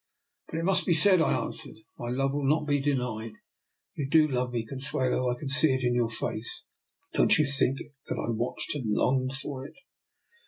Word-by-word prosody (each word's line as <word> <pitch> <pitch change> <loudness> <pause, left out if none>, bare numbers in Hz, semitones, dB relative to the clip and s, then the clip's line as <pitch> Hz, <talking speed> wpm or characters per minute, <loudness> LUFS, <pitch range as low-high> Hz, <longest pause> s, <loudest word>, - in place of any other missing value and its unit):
" - - -59
But 160 - -4
it 165 - -1
must 190 0 +2
be 170 - +4
said," 185 +1 +5
I - - +3
answered. 145 -5 -8
" - - -37
My 120 - -4
love 135 +2 0
will 140 -1 0
not 155 +1 +2
be 145 -1 +2
denied. 125 -6 -1 0.6
You 140 -2 -4
do 155 +1 +5
love 125 -3 -1
me, 115 -2 -2
Consuelo; 130 0 -1
I 125 - -1
can 140 - -6
see 135 0 +4
it 130 - -2
in 120 0 +2
your 120 -2 +1
face. 110 0 -4 0.5
Don't - - +4
you 155 - +4
think 135 -1 +1 0.3
that - - -2
I - - -2
watched 120 +7 -2
and 130 -8 -3
longed 130 +2 +1
for 135 0 -5
it? 140 - -11
135 Hz, 210 wpm, -28 LUFS, 125-150 Hz, 0.6 s, said